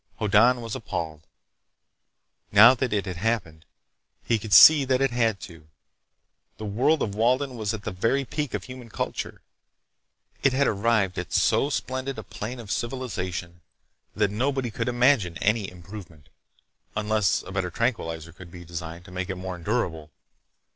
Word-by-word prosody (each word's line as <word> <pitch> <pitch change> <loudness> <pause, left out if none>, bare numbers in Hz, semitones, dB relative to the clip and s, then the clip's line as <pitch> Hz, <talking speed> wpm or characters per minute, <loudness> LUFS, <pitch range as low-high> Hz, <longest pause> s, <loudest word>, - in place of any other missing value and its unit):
Hoddan 115 +4 +4
was 115 -1 -5
appalled. 80 -7 -5 1.2
Now 110 +5 +9
that 130 -1 -2
it 105 -2 0
had 90 -3 -5
happened, 85 -6 -2 0.6
he 115 -2 +1
could 105 0 -8
see 145 - +9
that 130 -1 +1
it 135 -1 +1
had 115 -4 +1
to. 85 -4 -11 0.9
The 110 - -6
world 125 +10 +1
of 100 - -3
Walden 125 +5 +1
was 110 -3 -2
at 110 -2 -6
the - - -4
very 115 +9 0
peak 150 0 -3
of - - -4
human 125 -2 -10
culture. - - -5 1.0
It 140 - +3
had 140 +2 +2
arrived 105 -4 +1
at 90 - -6
so 140 - +2
splendid 130 -1 -3
a - - -6
plane 115 +3 -7
of 110 -4 -8
civilization 90 -9 -4 0.5
that 100 - +1
nobody 130 +2 -1
could 115 +2 -3
imagine 120 - +2
any 105 -1 0
improvement—unless 95 +3 -5
a - - -10
better 95 -2 -2
tranquilizer 85 -7 -2
could 85 +1 -13
be 85 0 -11
designed 85 +1 -7
to - - -13
make 90 +1 -4
it 95 - -2
more 95 0 -5
endurable. 80 -2 -2
105 Hz, 155 wpm, -25 LUFS, 90-125 Hz, 1.2 s, Now